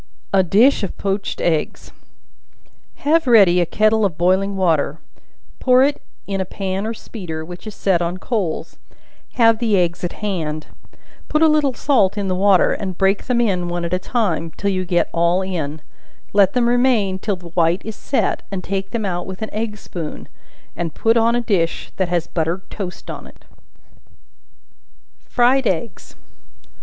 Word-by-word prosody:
A 195 - +6
Dish 210 +10 +4
of 195 - -4
Poached 195 0 -2
Eggs. 160 -3 -1 1.1
Have 320 0 +3
ready 195 -7 +6
a 175 - 0
kettle 215 +4 +2
of 185 -6 0
boiling 190 +3 +2
water, 160 -5 +1 0.6
pour 255 0 +5
it 285 +1 +1 0.2
in 195 -1 -2
a - - +1
pan 190 +2 -3
or 225 - -2
speeder, 165 -9 -7
which 175 +5 -10
is 215 - -7
set 185 -3 +1
on 175 +1 -2
coals; 195 -5 -3 0.5
have 225 -2 +4
the 220 -4 +2
eggs 175 -1 0
at 175 - -2
hand; 160 -7 -3 0.6
put 305 +1 +2
a - - +7
little 300 -4 +2
salt 215 -9 +2
in 200 -2 -1
the - - +1
water, 195 -1 +4
and 185 -3 -4
break 195 +1 +1
them 250 -2 +1
in, 185 -7 +1
one 175 0 -2
at 170 - -3
a 180 - +1
time, 185 -7 -1
till 200 0 0
you 185 -1 -1
get 175 -1 +1
all 170 +2 +2
in; 160 -5 -4 0.5
let 195 -2 +4
them 240 -1 +2
remain 240 -6 +2
till 205 0 -1
the 175 -2 -12
white 170 +1 +1
is 220 -1 -5
set, 275 - -1
and 190 -2 -4
take 195 0 -3
them 225 -3 -3
out 175 -2 -3
with 190 +3 -6
an 220 - -6
egg 215 0 -3
spoon, 165 -6 -7 0.5
and 165 -2 -4
put 225 0 +2
on 230 0 +3
a 240 - +1
dish 185 -8 -1
that 185 -2 0
has 175 -2 0
buttered 170 +3 -2
toast 185 -4 -6
on - - -8
it. - - -19 1.8
Fried 250 +1 +3
Eggs. 185 +1 -4
195 Hz, 175 wpm, -20 LUFS, 175-220 Hz, 1.8 s, a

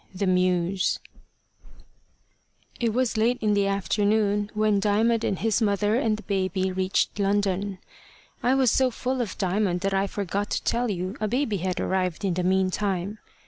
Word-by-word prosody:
THE 195 - -1
MEWS 180 0 +1 1.8
IT 235 - +1
WAS 245 0 0
late 235 +3 +2
in 210 -1 +1
the 200 -1 +2
afternoon 205 +1 +1
when 215 -1 +2
Diamond 220 +3 +2
and 195 - 0
his 225 +2 0
mother 205 0 +1
and 225 -3 +1
the 215 - -11
baby 190 -1 -1
reached 185 +2 0
London. 200 -1 0 0.6
I 250 +2 +3
was 260 -4 +3
so 260 -1 +3
full 255 +2 -2
of 220 -6 -4
Diamond 190 -1 0
that 195 0 -1
I 195 +1 +1
forgot 200 +1 -3
to - - -2
tell 240 0 0
you 185 0 -3
a 215 - 0
baby 235 -2 0
had 185 0 -2
arrived 185 0 -1
in 190 - +1
the 180 - -1
meantime. 190 +2 0
200 Hz, 165 wpm, -25 LUFS, 190-220 Hz, 1.8 s, I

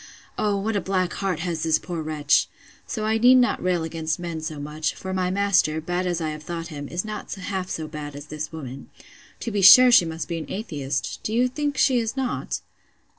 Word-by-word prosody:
O, 205 -1 0
what 210 +2 -2
a 200 - +1
black 185 0 -1
heart 190 -5 -2
has 170 -2 -2
this 160 -1 +3
poor 175 -3 -5
wretch! 150 -2 +2 0.4
So 215 -2 -3
I 220 +1 +1
need 250 +3 +7
not 250 -1 +3
rail 180 -2 +1
against 160 -1 -2
men 170 -2 -5
so 155 -2 -5
much; 150 +1 -3
for 190 0 -6
my 185 -1 0
master, 190 -5 +2
bad 175 +3 -2
as 175 -1 -1
I 160 -2 -2
have 155 0 -7
thought 165 +1 -5
him, 145 -3 -6
is 175 +6 -3
not 215 -1 -6
half 190 -1 -4
so 160 -1 -4
bad 150 -2 -7
as 145 0 -8
this 150 0 -6
woman.—To 140 - -10
be 205 -1 0
sure 245 +7 +10
she 220 -8 +7
must 165 0 -5
be 170 -1 -3
an 160 - -8
atheist!—Do 145 - -4
you 245 +3 +3
think 290 +2 -3
she 260 -3 +4
is 230 +3 -3
not? 260 -2 -2
175 Hz, 215 wpm, -24 LUFS, 155-205 Hz, 0.4 s, sure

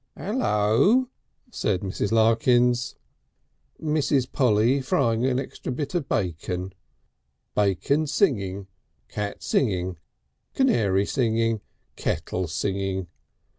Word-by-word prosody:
"Ello!" 205 - +2 0.4
said 100 - -1
Mrs. 100 +1 -2
Larkins. 120 +2 +3 0.8
"Mrs. 150 -4 +1
Polly 125 +1 +3
frying 120 -2 +1
an 130 -1 +1
extra 135 - -6
bit 140 +5 -4
of 170 -6 -2
bacon. 90 0 -2 0.8
Bacon 105 - +1
singing, 100 - 0 0.4
cat 105 -2 -4
singing, 95 - 0 0.6
canary 100 - +2
singing. 115 -2 0 0.4
Kettle 90 -1 -2
singing. 95 +2 -2
115 Hz, 90 wpm, -25 LUFS, 95-135 Hz, 0.8 s, Larkins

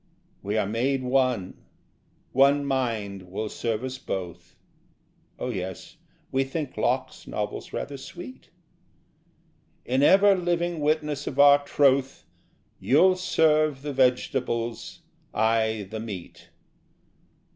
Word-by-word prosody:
We 105 +2 -2
are 105 - +1
made 130 +6 -1
one. 125 -7 0 0.7
One 140 +2 +4
mind 110 -8 -2
will 105 +3 -4
serve 115 +1 -3
us 130 0 -5
both. 90 -7 -6 0.8
('Oh 125 - -4
yes, 95 - -6 0.3
we 135 0 +2
think 140 +1 -5
Locke's - - -2
novels - - -4
rather 140 0 -5
sweet!') 130 -1 -11 1.4
In 130 +2 +1
ever 195 +6 +6
living 175 -2 -1
witness 150 -1 -1
of 135 - -4
our 145 0 +7
troth 135 - +1 0.5
You'll 185 +8 +4
serve 155 -5 +2
the 145 -1 -4
vegetables, 125 -3 -1 0.3
I 110 -2 +1
the 110 - -4
meat... 100 -6 -8
130 Hz, 110 wpm, -26 LUFS, 110-145 Hz, 1.4 s, our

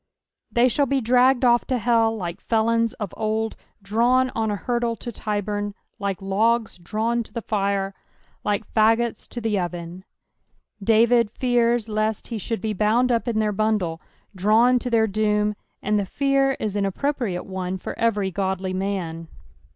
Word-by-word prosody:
— - - -57
They 240 +1 +6
shall 280 +3 +1
be 275 +1 +1
drs^ned 250 +2 +3
off 240 -1 +4
to 255 - 0
hell 225 -1 +2
like 175 -4 -5
felons 230 0 +1
of 210 -4 -6
old 220 +1 -1 0.3
drawn 245 +5 +2
on 220 -1 -1
a 205 - 0
hurdle 235 +2 -1
to 240 - -7
Tyburn, 205 -1 -3 0.2
liko 200 -1 -2
logjs 215 +1 +1
drawn 225 +6 -1
to 230 - -10
the 235 - -5
nre, 195 -2 -1 0.5
like 205 +1 -1
fagots 225 +1 +2
to 240 - -5
the 220 -3 0
oven. 175 0 -5 0.8
David 230 +1 +4
fears 240 -1 +1
lest 215 0 -1
he 230 -2 -3
should 225 0 -3
be 215 0 -1
bouna 220 +5 +2
up 235 +1 0
in 230 -2 0
their 215 -1 +1
bundle, 205 -6 0 0.3
drawn 225 +6 +4
to 250 - -4
their 225 -2 +3
doom; 210 0 +1 0.3
and 210 +1 +1
the 200 - -2
fear 275 +3 +2
is 210 -2 -2
an 200 -1 +1
appropriate 235 -4 -2
one 190 -1 -4
for - - -6
every 210 -4 +1
godly 190 0 -2
man. 185 -4 -3
220 Hz, 165 wpm, -23 LUFS, 200-235 Hz, 0.8 s, They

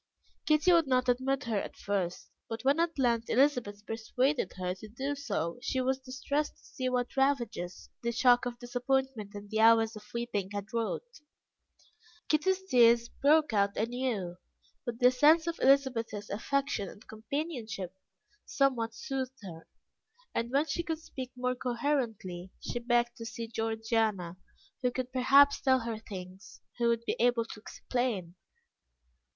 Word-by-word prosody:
Kitty 305 +4 +5
would 335 -3 +4
not 255 -1 +2
admit 260 +2 +1
her 225 -4 0
at - - -8
first, 190 -3 -3 0.2
and 225 0 -4
when 275 +4 +3
at 335 -1 0
length 235 -3 +1
Elizabeth 240 -6 +2
persuaded 240 +1 0
her 180 -1 -2
to 190 +3 -11
do 265 +6 -3
so, 245 - -3
she 260 - -1
was 260 +1 +1
distressed 275 +3 -3
to - - -26
see 255 -1 -3
what 245 -1 -1
ravages 240 -10 0
the 235 - -1
shock 245 +1 +4
of 240 -1 -5
disappointment 245 -3 -2
and 205 0 -9
the 220 - 0
hours 225 0 +5
of 210 - -9
weeping 235 -5 -2
had 205 +2 -5
wrought. 235 - -3 1.1
Kitty's 375 +5 +2
tears 235 -7 +5
broke 300 -2 +3
out 200 -1 +2
anew, 225 -6 -2 0.5
but 235 -1 -3
the 250 0 +6
sense 305 +6 +5
of 335 -1 -3
Elizabeth's 250 -6 +2
affection 270 -1 -1
and 205 - -15
companionship 220 - -4 0.5
somewhat 240 -5 0
soothed 265 0 -4
her, 165 -4 -9 0.7
and 230 +1 -1
when 280 +4 +2
she 320 +3 -2
could 325 -2 -3
speak 260 -5 -8
more 250 0 0
coherently, 235 -8 -2
she 240 - -4
begged 240 0 +1
to 230 - -7
see 230 +1 -5
Georgiana, 220 -5 -1 0.5
who 250 - +2
could 255 +1 -4
perhaps 275 +2 +5
tell 260 -2 +3
her 230 -1 -4
things 190 -2 -10 0.2
who 235 - +3
would 235 0 +1
be - - 0
able 240 -1 +3
to 225 - -9
explain. 220 -6 -3
240 Hz, 155 wpm, -31 LUFS, 220-270 Hz, 1.1 s, the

